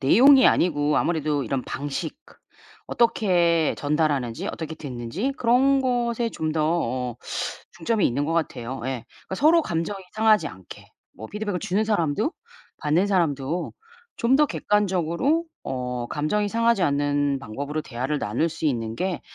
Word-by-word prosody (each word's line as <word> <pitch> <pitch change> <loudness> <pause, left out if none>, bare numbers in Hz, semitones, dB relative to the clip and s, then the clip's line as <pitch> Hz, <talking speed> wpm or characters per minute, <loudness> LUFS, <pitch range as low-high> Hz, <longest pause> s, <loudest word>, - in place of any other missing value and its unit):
내용이 260 - +7
아니고 150 -3 +2
아무래도 155 -4 0
이런 135 -2 -2
방식 145 - -4
그 - - -19 0.5
어떻게 175 -8 +2
전달하는지 145 -5 0
어떻게 160 -1 -5
됐는지 145 - -4
그런 265 +3 +3
것에 240 -2 0
좀 155 -1 -3
더 155 -1 0 0.5
어 - - -18 0.6
중점이 190 +5 +1
있는 140 +4 0
것 160 - -1
같아요. 135 -6 -2
예. 130 -3 -3 0.2
그러니까 190 - -4
서로 320 - +5
감정이 175 - -3
상하지 215 -7 +3
않게 95 -1 -12 0.3
뭐 110 - -9
피드백을 205 -3 -3
주는 210 +1 0
사람도 210 - 0 0.5
받는 165 +6 +2
사람도 165 -3 0 0.4
좀 245 +3 +3
더 300 - +5
객관적으로 210 - 0 0.2
어 125 -2 -3
감정이 205 +8 0
상하지 230 -2 +2
않는 145 -2 +1
방법으로 140 +6 -4
대화를 135 +2 -3
나눌 120 +11 0
수 160 0 -3
있는 115 -4 -1
게 185 0 -2
165 Hz, 325 characters per minute, -24 LUFS, 140-210 Hz, 0.6 s, 내용이